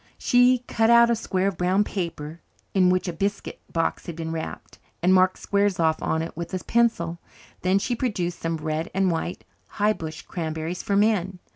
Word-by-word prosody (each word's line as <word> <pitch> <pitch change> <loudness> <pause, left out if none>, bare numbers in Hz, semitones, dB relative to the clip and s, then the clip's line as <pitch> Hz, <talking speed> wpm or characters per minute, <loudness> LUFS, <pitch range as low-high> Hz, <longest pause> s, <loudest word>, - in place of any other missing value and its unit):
She 245 0 +4
cut 225 0 +2
out 235 0 +7
a - - +3
square 190 -4 -1
of 195 -4 -3
brown 185 +3 +3
paper, 165 -5 -5 0.3
in 185 -2 +4
which 185 +1 +1
a 175 - -2
biscuit 200 +4 -3
box 165 -1 -1
had 170 - -5
been 160 -1 -4
wrapped, 160 -1 -6 0.2
and 185 +1 +5
marked 185 0 +4
squares 200 -2 0
off 160 -1 +2
on 160 0 0
it 165 - -7
with 170 0 -6
a 185 - -4
pencil. 175 -8 +1 0.4
Then 185 +2 +3
she 240 +5 -1
produced 185 -8 -2
some 165 0 -2
red 155 +1 -3
and 190 -2 +2
white 170 +2 -3 0.3
high 210 +1 +3
bush 155 -4 -7
cranberries 160 0 -4
for 200 - -1
men. 200 -3 +2
180 Hz, 190 wpm, -24 LUFS, 165-205 Hz, 0.4 s, out